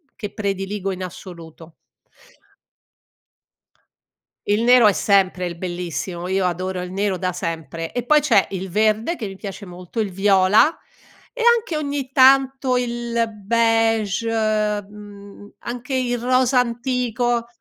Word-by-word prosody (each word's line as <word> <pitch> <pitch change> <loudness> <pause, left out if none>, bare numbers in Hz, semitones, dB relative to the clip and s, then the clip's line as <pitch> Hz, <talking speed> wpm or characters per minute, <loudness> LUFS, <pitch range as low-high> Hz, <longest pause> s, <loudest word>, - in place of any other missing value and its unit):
che 205 -2 -7
prediligo 195 -1 -3
in 185 0 -5
assoluto 165 -2 -11 2.7
Il 205 +2 +2
nero 245 -1 +6
è - - +6
sempre 185 -3 +1
il 170 -1 -7
bellissimo, 175 0 -5
io 190 0 0
adoro 185 +1 -2
il 180 - -7
nero 195 0 -1
da 185 -1 -2
sempre, 165 -2 -5
e 245 - -3
poi 300 +2 +5
c'è 240 -10 +3
il 190 0 -5
verde 215 - +1
che 225 - -6
mi 195 -1 -7
piace 200 0 -8
molto, 180 +5 -8
il 205 -3 -1
viola, 195 +5 +4 0.6
e - - -6 0.2
anche 430 -8 -5
ogni 285 -3 -3
tanto 265 -1 +4
il 235 -1 -1 0.2
beige, 225 -1 +1
uhm, 210 -2 -3
anche 250 +2 -5
il 245 -1 -1
rosa 255 +1 +2
antico 240 -1 -1
210 Hz, 130 wpm, -21 LUFS, 185-240 Hz, 2.7 s, nero